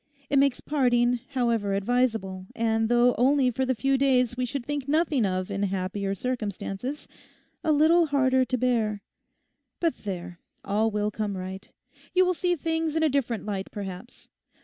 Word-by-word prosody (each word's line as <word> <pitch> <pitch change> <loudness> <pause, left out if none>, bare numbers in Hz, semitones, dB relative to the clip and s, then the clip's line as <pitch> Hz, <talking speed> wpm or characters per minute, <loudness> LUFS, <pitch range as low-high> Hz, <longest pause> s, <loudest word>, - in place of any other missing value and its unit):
It 280 - +4
makes 275 -2 +2
parting, 245 -4 +2
however 230 -6 +1
advisable, 200 -4 0
and 225 -1 +1
though 240 +1 +4
only 260 0 +4
for 260 +2 -1
the 260 - +1
few 270 +3 +1
days 250 -3 +3
we 250 0 -1
should 260 0 -4
think 290 -1 -3
nothing 295 -6 +2
of 185 +1 -2
in 200 0 -2
happier 195 0 -2
circumstances, 245 +3 -4 0.6
a 315 - +2
little 320 +3 +4
harder 260 -2 +3
to 255 0 -1
bear. 220 -5 0 0.8
But 335 -2 0
there, 180 -3 -6 0.3
all 215 +3 +1
will 210 0 -1
come 210 -2 -3
right. 190 +2 -7 0.4
You 370 0 +5
will 365 - +2
see 355 0 0
things 320 0 -1
in 320 - +2
a 315 - +4
different 250 -6 -1
light, 195 -2 -3
perhaps. 200 +3 -8
245 Hz, 165 wpm, -26 LUFS, 205-275 Hz, 0.8 s, You